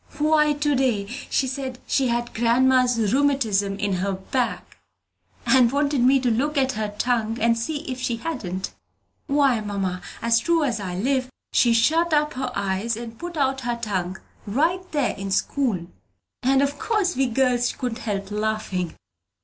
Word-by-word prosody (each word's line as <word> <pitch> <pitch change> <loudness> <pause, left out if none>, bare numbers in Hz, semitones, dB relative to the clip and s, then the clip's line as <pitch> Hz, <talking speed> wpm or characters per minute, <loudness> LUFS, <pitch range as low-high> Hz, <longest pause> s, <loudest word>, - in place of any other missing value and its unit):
Why, 300 0 +3
to 295 0 0
day 245 -7 +1
she 255 +4 -2
said 260 -1 -4
she 270 -2 +1
had 240 0 -1
grandma's 250 +1 +3 0.2
rheumatism 225 -9 +1
in 200 -1 -1
her 195 +2 -1
back, 235 +6 -3 0.7
and 250 -3 +5
wanted 285 -1 +1
me 265 +2 +5
to 250 -2 +1
look 285 +7 0
at 265 -1 +2
her 215 -3 -4
tongue 230 -2 0
and 230 +1 +3
see 285 +6 -3
if 260 -5 -5
she 240 -2 0
hadn't. 190 - -4 0.5
Why, 275 -4 +3
mother, 195 -3 -3 0.2
as 230 0 +3
true 330 +5 +2
as 240 -6 0
I 185 -3 -4
live, 255 +6 0 0.2
she 240 - +4
shut 315 +9 +3
up 300 0 +2
her 255 -1 -3
eyes 200 +3 -1
and 230 -1 -8
put 345 -1 -6
out 270 -1 +1
her 240 -1 -2
tongue 190 -5 -2 0.3
right 320 - +1
there 290 -5 +1
in 195 0 -5
school, 200 -2 0 0.6
and 270 +2 +3
of 280 +1 -2
course 410 -7 0
we 265 0 +2
girls 245 0 +2
couldn't 245 -2 -4
help 200 -3 -4
laughing!" 210 -5 -2
245 Hz, 165 wpm, -23 LUFS, 215-275 Hz, 0.7 s, and